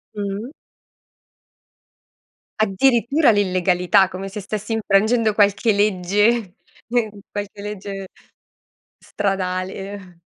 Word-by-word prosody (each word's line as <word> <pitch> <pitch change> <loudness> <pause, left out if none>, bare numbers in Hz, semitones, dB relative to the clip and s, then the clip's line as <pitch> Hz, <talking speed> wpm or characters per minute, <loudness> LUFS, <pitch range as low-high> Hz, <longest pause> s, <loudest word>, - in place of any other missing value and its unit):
Mh 205 - -4 0.2
mh. 260 - -10 2.1
Addirittura 235 +6 +3
l'illegalità, 185 -2 +2
come 190 +1 -7
se 210 - -6
stessi 210 +2 -5
infrangendo 220 +1 +2
qualche 205 +2 +3
legge, 205 +1 +1 0.3
nel 235 -2 0 0.2
qualche 205 0 -6
legge 200 -1 -6 0.9
stradale. 190 -1 -4
205 Hz, 80 wpm, -21 LUFS, 190-215 Hz, 2.1 s, Addirittura